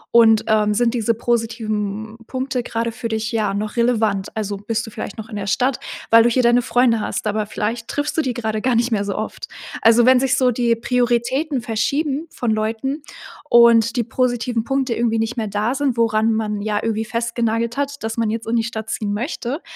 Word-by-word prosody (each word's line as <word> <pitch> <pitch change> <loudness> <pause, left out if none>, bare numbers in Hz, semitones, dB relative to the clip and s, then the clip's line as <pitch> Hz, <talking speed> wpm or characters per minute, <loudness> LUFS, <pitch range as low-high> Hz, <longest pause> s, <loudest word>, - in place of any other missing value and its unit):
Und, 225 -2 +6
ähm, 210 -1 +3
sind 240 +1 +2
diese 230 0 +1
positiven 220 -2 -2
Punkte 260 -1 -2
grade 230 0 -2
für 230 0 -5
dich, 220 +1 -2
ja 215 -3 0
noch 210 +2 -3
relevant? 220 -5 +1
Also 205 -2 -3
bist 220 +3 -3
du - - -9
vielleicht 205 - -6
noch 220 +1 -7
in 210 - -7
der 200 -1 -3
Stadt, 255 +4 +1 0.3
weil 230 0 +7
du 240 - +4
hier 255 +2 +2
deine 240 +1 +4
Freunde 245 -2 +3
hast, 215 - -3
aber 210 0 0
vielleicht 225 +2 -3
triffst 290 +2 -2
du - - +4
die 255 -4 -2
grade 220 -2 -2
gar 255 -1 +1
nicht 235 +1 +1
mehr 205 -2 0
so 200 - -3
oft" 215 - -5 0.4
Also 230 +1 +6
wenn 255 -1 +6
sich 265 0 +2
so 255 -2 +3
die 235 -1 +1
Prioritäten 250 +4 0
verschieben 280 +7 -1
von 240 - -3
Leuten 225 +7 -2 0.5
und 235 0 +6
die 235 - +2
positiven 245 -1 -1
Punkte 270 -2 -1
irgendwie 225 -1 +1
nicht 225 +2 -2
mehr 220 - -1
da 210 +5 -1
sind, 270 -3 0
woran 225 -1 +2
man 210 -1 -2
ja 210 0 -1
irgendwie 220 0 -1
festgenagelt 230 0 -1
hat, 280 -1 -3
dass 225 +1 -3
man 225 -2 +1
jetzt 225 0 -4
in 230 - 0
die 225 - +2
Stadt 220 -1 -5
ziehen 205 -2 -2
möchte, 260 - -3
230 Hz, 210 wpm, -20 LUFS, 220-245 Hz, 0.5 s, weil